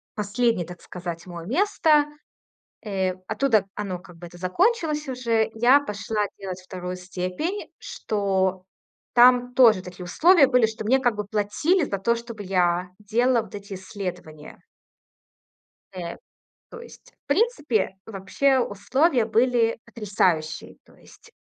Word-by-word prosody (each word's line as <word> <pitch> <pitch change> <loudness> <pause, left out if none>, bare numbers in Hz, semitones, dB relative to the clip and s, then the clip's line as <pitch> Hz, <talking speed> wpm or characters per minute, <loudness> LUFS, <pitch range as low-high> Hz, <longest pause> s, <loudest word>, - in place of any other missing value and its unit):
последнее, 210 -2 0
так 175 +1 -11
сказать, 175 -2 -7
мой 170 -2 -8
место. 310 - +3 0.8
Э, 190 -3 -2
оттуда 220 -3 +2
оно, 195 -4 -4
как 180 -1 -15
бы, 175 - -10
это 175 +1 -14
закончилось 305 - 0
уже. 230 -3 0
Я 250 +6 +5
пошла 210 -3 -2
делать 185 -2 -6
2 185 -1 -6
степень, 185 - -4
что 195 - -1 0.5
там 245 0 +5
тоже 230 -7 +6
такие 180 0 -10
условия 315 - +5
были, 250 -4 +3
что 220 -1 -7
мне 265 +4 +3
как 245 -4 +1
бы 210 0 -4
платили 220 - +1
за 200 -8 -2
то, 235 +5 +1
чтобы 230 -3 -8
я 180 -1 +1
делала 235 +3 +2
вот - - -14
эти 200 -1 -8
исследования. 180 -5 -8 1.3
Э, 175 -2 -6 0.5
то 470 - -10
есть, 475 - -15
в - - -
принципе, 295 - +1
вообще 225 +7 +1
условия 245 - +1
были 230 0 +2
потрясающие, 180 -7 -1
то - - -22
есть - - -19
210 Hz, 135 wpm, -24 LUFS, 185-255 Hz, 1.3 s, тоже